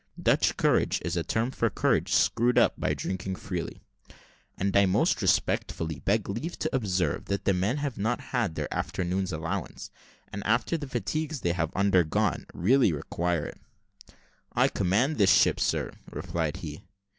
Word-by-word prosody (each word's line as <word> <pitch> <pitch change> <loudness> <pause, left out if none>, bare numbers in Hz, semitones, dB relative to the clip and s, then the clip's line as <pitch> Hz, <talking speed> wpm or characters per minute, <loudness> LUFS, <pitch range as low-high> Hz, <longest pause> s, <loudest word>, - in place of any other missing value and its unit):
(Dutch - - +2
courage - - +2
is 85 0 -1
a 85 - +1
term 115 +9 -1
for 115 -3 0
courage - - +1
screwed 120 +2 +3
up - - +5
by - - -1
drinking 95 0 -3
freely.) 90 -2 -5 0.7
"And 95 0 -1
I 100 -1 +5
most 95 - +2
respectfully 80 -3 0
beg 105 +1 0
leave 130 - -4
to - - -2
observe, 95 -7 0
that 100 0 -3
the 100 - +3
men 95 +9 0
have 145 -6 -3
not 110 +4 0
had 115 -10 0
their - - -3
afternoon's 95 +1 -2
allowance; 85 +3 -4 0.4
and, 100 - -4
after 120 +9 +1
the 150 -3 -4
fatigues 135 +6 -2
they 85 - +1
have 85 -2 -1
undergone, 95 -5 +2
really 120 +3 +3
require 85 +2 -2
it." - - -9 0.9
"I - - +3
command 105 - +1
this 100 -2 +6
ship, - - +4
sir," - - 0 0.2
replied 80 0 -3
he. 80 -5 -7
95 Hz, 160 wpm, -28 LUFS, 90-115 Hz, 0.9 s, this